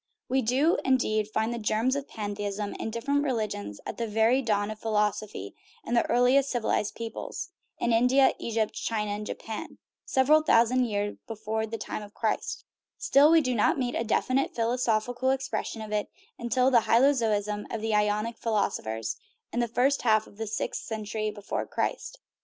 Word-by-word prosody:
We 265 +1 +2
do, 265 +9 +2
indeed, 215 -5 +1
find 220 +2 0
the 235 - -4
germs 225 +4 +1
of 280 0 -4
pantheism 205 -1 -4
in - - -3
different 280 +6 0
religions 215 - -3
at - - -5
the 230 - -1
very 225 +5 +3
dawn 210 -3 0
of 215 - -8
philosophy 210 - -1 0.3
in - - -3
the 235 - +2
earliest 250 +3 +4
civilized 225 -3 0
peoples 230 -1 -6 0.3
(in 235 - +1
India, 250 +4 +5
Egypt, 220 -2 -1
China, 210 -2 -2
and 210 +1 -4
Japan), 220 -1 -6 0.3
several 295 +4 +4
thousand 250 -3 +4
years 205 -2 -2
be 225 - -5
fore 220 +1 -2
the 225 +1 -4
time 215 - -5
of 205 0 -12
Christ; 220 -2 -2 0.3
still, 285 +2 +5
we 325 0 +6
do 255 -3 0
not 215 - +2
meet 245 -2 -1
a - - -1
definite 255 +4 0
philosophical 245 +1 0
expression 265 -4 -2
of 215 - -8
it 210 -1 -1 0.3
until 250 +2 +2
the 235 -3 +4
hylozoism 220 -5 +2
of 225 - -3
the 220 0 -1
Ionic 210 +2 +1
philosophers, 115 - -1 0.4
in 240 - 0
the 240 - +1
first 255 +5 +2
half 220 -2 +3
of 205 - -18
the 225 0 -4
sixth 215 - -3
cen 220 -2 -5
tury 215 0 -2
before 205 -1 -4
Christ. - - -3
225 Hz, 175 wpm, -28 LUFS, 210-250 Hz, 0.4 s, we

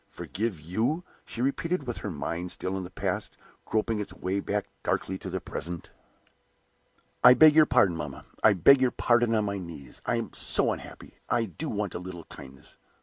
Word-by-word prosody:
"Forgive 105 -4 -3
you?" 110 - -1 0.2
she 120 - -4
repeated, 155 +4 -1
with 120 -2 -4
her 105 - -5
mind 85 +2 -4
still 95 +1 -3
in 95 - -3
the 90 - -8
past, 95 - -3 0.3
groping 110 0 0
its 105 - -4
way 95 +2 -2
back 100 +1 -2 0.2
darkly 95 0 -2
to 95 - -6
the 95 +1 -3
present. 85 0 -7 1.3
"I 125 0 +10
beg 155 +3 +8
your 155 0 +6
pardon, 100 -9 +4
mamma 75 -4 -6 0.2
I 105 - +7
beg 130 - +6
your 130 - +4
pardon 120 -1 +2
on 110 -1 +2
my 100 -1 -2
knees. 80 -8 -9
I - - +2
am - - -3
so - - +3
unhappy; - - -9
I 120 -1 +2
do 135 - -6
so 110 - -3
want 100 -2 -2
a - - -4
little 90 -2 -8
kindness! 65 -3 -12
100 Hz, 195 wpm, -28 LUFS, 90-120 Hz, 1.3 s, I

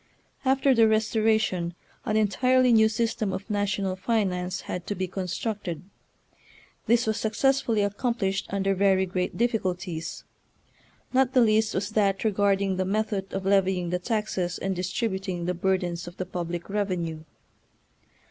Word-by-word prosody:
After 270 0 +3
the 230 -2 +5
Restoration 215 -5 +1 0.3
an 215 -2 +1
entirely 250 +4 +3
new 220 -1 +6
system 220 -2 -1
of 190 - -5
national 200 -2 0
finance 185 -3 -1
had 180 - -6
to 205 - -2
be 185 0 -2
con 185 +1 -4
structed. 185 -3 -3 1.1
This 235 +1 +3
was 220 0 0
successfully 225 0 +1
accom 220 +4 -1
plished 195 -2 -1
under 195 0 +1
very 190 0 +3
great 180 0 -3
difficulties. 185 -8 -2 0.9
Not 260 0 +3
the 255 - +5
least 220 -1 +3
was 200 +2 -2
that 200 -3 +1
regarding 200 -2 +1
the 185 - +1
method 200 -1 -1
of 195 0 -4
levying 190 -3 +2
the 180 - 0
taxes 190 -4 -2
and 195 0 -2
distributing 185 -1 -2
the 180 - 0
burdens 180 -1 -1
of 175 - -10
the 185 - -3
public 175 -1 -4
revenue. 185 -6 -2
195 Hz, 145 wpm, -26 LUFS, 185-220 Hz, 1.1 s, new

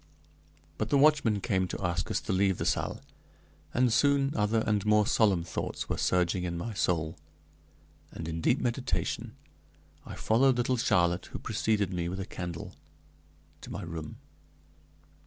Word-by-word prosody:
But - - -1
the 140 - +4
watchman 135 -8 +4
came 95 -4 0
to 90 - -4
ask 85 0 -1
us - - 0
to - - -2
leave 95 0 +2
the - - -3
salle, - - -1 0.7
and 125 -2 +2
soon 140 +1 +3
other 110 +1 +1
and 105 -2 +1
more 105 0 +4
solemn 100 -6 +3
thoughts 85 - -4
were - - -1
surging 90 0 +1
in 85 -1 -3
my 110 +7 -4
soul, 80 -5 -1 0.9
and 80 - -7
in 80 0 -4
deep 125 - +3
meditation 125 +1 -2 0.7
I - - -8
followed 125 +3 +3
little 125 +1 +1
Charlotte, 90 -6 +2
who - - -7
preceded 105 -4 0
me 85 -1 -2
with 95 +2 -5
a 95 - -3
candle 85 -4 -6 0.9
to - - -10
my 100 - -5
room. 80 -3 -7
100 Hz, 155 wpm, -29 LUFS, 85-115 Hz, 0.9 s, the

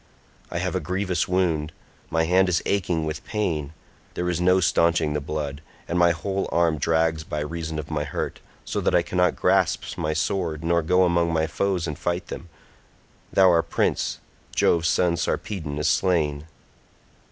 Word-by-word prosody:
I - - -4
have - - -1
a - - 0
grievous 90 -1 -1
wound; 85 -4 0 0.4
my 80 0 +1
hand 90 +3 +3
is 85 - +1
aching 90 -5 0
with 75 0 -4
pain, 80 -9 -2 0.4
there 90 0 -1
is 85 0 -2
no 90 +1 +4
staunching 85 -3 +2
the 75 - -1
blood, 75 -1 -4 0.3
and 85 - 0
my 85 0 +6
whole 95 +4 -2
arm 85 -3 +2
drags 80 +1 +1
by 75 -2 -4
reason 80 +1 -4
of 75 0 -6
my 75 -1 -1
hurt, 70 - -4 0.3
so - - -2
that - - +1
I 85 - +4
cannot 90 0 +1
grasp - - +1
my 75 0 0
sword 80 -1 -1
nor 85 +1 +2
go 90 +3 +3
among 85 -1 +2
my 80 -1 +1
foes 90 +1 -1
and 75 -2 -5
fight 85 +1 -2
them, 85 - -7 0.8
though 95 -1 +6
our 85 -1 +4
prince, 85 - -1 0.4
Jove's 85 0 +3
son 85 -2 +2
Sarpedon, 80 -5 -3
is 75 - 0
slain. 80 -5 +1
85 Hz, 175 wpm, -24 LUFS, 80-90 Hz, 0.8 s, my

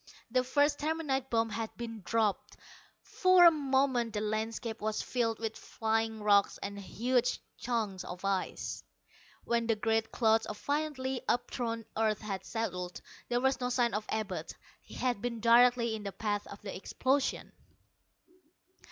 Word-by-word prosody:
The 255 +1 +3
first 285 +3 +2
terminite 295 -4 -1
bomb 225 -1 +1
had 225 0 -4
been 230 -2 -6
dropped! 215 0 0 0.5
For 370 -1 +5
a 340 - +10
moment 265 -6 +1
the 210 - -1
landscape 220 +1 -3
was 215 0 -1
filled 230 -3 0
with 225 -1 -3
flying 225 -1 -2
rocks 205 -1 +4
and 200 0 -5
huge 245 +5 0 0.2
chunks 225 -6 -2
of 180 +2 -7
ice. 195 -2 -2 0.6
When 235 -1 0
the 225 - +3
great 225 +1 0
clouds 225 -1 +3
of 210 - -5
violently 285 -3 -2
upthrown 230 -2 -1
earth 215 -1 +1
had 195 -3 -5
settled, 180 -6 -3 0.3
there 240 0 +1
was 265 0 +1
no 245 - 0
sign 240 -2 +2
of 210 +1 -2
Abud. 215 -4 -3 0.3
He - - -13
had 245 -5 -1
been 235 -1 -3
directly 235 0 +5
in 220 - -4
the 200 -1 -4
path 205 0 -2
of 200 - -11
the 200 - -5
explosion! 265 +8 0
230 Hz, 150 wpm, -31 LUFS, 215-250 Hz, 0.6 s, a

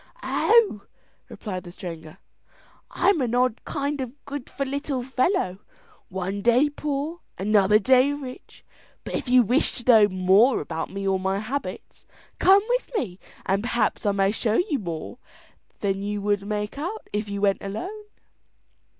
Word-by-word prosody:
"Oh!" 435 - +3 0.5
replied 185 -4 -6
the 175 - -10
stranger, 165 -3 -9 0.7
"I'm 360 -4 +2
an 245 -2 0
odd 250 -2 +1
kind 285 0 -2
of 255 - -3 0.2
good 280 -2 -6
for 275 - -3
little 275 -1 -3
fellow, 255 - 0 0.5
one 190 +2 -3
day 245 +7 +4
poor, 295 +3 -3 0.2
another 205 +1 +4
day 260 +4 +4
rich, 275 -3 -9 0.4
but - - -7
if - - -3
you 250 0 +6
wish 250 +7 +2
to 240 - -5
know 215 -3 +7
more 190 +7 +4
about 160 +2 -4
me 195 0 -4
or 190 -1 +2
my 190 +1 0
habits, 245 +7 -6 0.3
come 390 +2 +6
with - - 0
me 190 -7 -3 0.3
and 195 +1 +1
perhaps 240 +1 0
I 205 - +2
may 195 0 +2
show 220 0 0
you 310 -2 +1
more 170 +5 -6 0.6
than 195 -1 0
you 205 +1 -2
would 205 0 -1
make 210 +4 -3
out 375 +9 -5
if 210 0 -2
you 200 0 -3
went 200 -1 +2
alone." 370 - -6
220 Hz, 160 wpm, -25 LUFS, 195-280 Hz, 0.7 s, know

